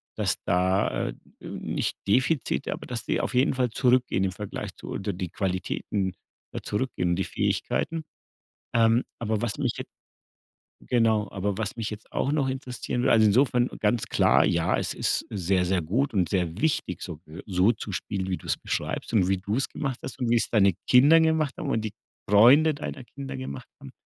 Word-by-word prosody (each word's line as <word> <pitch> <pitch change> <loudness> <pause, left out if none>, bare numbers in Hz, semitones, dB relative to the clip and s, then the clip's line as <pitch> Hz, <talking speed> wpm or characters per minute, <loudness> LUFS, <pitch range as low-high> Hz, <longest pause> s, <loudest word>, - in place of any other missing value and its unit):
dass 105 -4 +1
da 95 +2 +1
äh, - - -5 0.3
nicht - - -3
Defizite, 130 +7 +1
aber - - -8
dass 125 -2 -4
die - - 0
auf - - -2
jeden 130 +3 +3
Fall 125 -1 +1
zurückgehen 125 -5 +2
im 95 - 0
Vergleich 100 +1 -6
zu - - -10
oder 100 +1 -3
die 90 0 -4
Qualitäten 95 0 -2 0.4
ja - - -4
zurückgehen, 105 -6 -1
die 95 - 0
Fähigkeiten. 165 +10 -1 0.7
Ähm, 115 +1 +4 0.2
aber 110 -2 -1
was 120 - -2
mich 135 -5 0
jetzt - - -7 1.0
genau, 110 -4 +2
aber 100 0 -2
was 105 -1 -3
mich 115 -3 -3
jetzt 105 0 -9
auch 140 - 0
noch 145 -3 +1
interessieren 125 -2 -3
w 130 - +2
also, 110 -3 +5
insofern 125 +3 +3
ganz 110 +2 +1
klar, - - +4
ja, - - +2
es - - -1
ist - - 0
sehr, 95 -1 +1
sehr 90 0 +1
gut 115 - 0
und 95 -6 +1
sehr 90 0 -1
wichtig 130 - 0
so 85 - -6
be 80 +1 -12
so 95 +2 +3
zu 110 -2 -7
spielen, 95 0 -3
wie 95 - -1
du - - -14
es - - 0
beschreibst - - -3
und 95 -5 +4
wie 95 0 +2
du 100 +4 -2
es 135 - -1
gemacht 135 -4 -3
hast 125 - -7
und 125 -3 -1
wie 120 - +4
es 115 - 0
deine 100 -4 +4
Kinder 140 +6 +7
gemacht 160 -3 +2
haben 145 - -4
und 115 - +1
die 110 -2 -4 0.4
Freunde 130 +10 +6
deiner 140 -2 -6
Kinder 135 +1 -7
gemacht 130 -1 -7
haben. 135 -1 -10
110 Hz, 195 wpm, -26 LUFS, 95-130 Hz, 1.0 s, Kinder